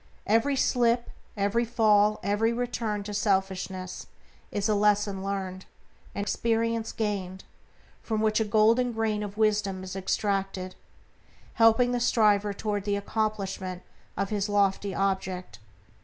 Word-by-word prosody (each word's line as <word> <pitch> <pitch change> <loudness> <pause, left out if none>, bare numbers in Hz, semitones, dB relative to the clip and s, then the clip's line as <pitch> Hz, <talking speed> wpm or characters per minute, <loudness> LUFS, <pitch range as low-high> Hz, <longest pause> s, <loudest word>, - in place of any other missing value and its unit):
Every 230 +7 +2
slip, 240 -2 +1 0.3
every 205 +4 +1
fall, 215 -3 +3
every 205 +3 +1
return 230 -3 -2
to 205 +1 -6
selfishness 190 -2 -2 0.4
is 205 -1 -1
a 215 - +2
lesson 205 -1 +2
learned, 190 -1 -4 0.5
an 200 - -2
experience 230 +1 0
gained, 190 -4 -3 0.6
from 220 -2 -2
which 215 0 +2
a - - +2
golden 225 +3 +3
grain 220 -2 -1
of 205 0 -6
wisdom 205 -3 +1
is 185 0 -7
extracted, 195 -1 -2 0.8
helping 230 +1 +4
the 245 - 0
striver 210 -3 +3
toward 205 0 -3
the 205 -1 0
accomplishment 200 -3 -3 0.3
of 195 +2 -2
his 205 0 -1
lofty 200 -1 +1
object. 190 -2 -2
205 Hz, 125 wpm, -27 LUFS, 195-225 Hz, 0.8 s, helping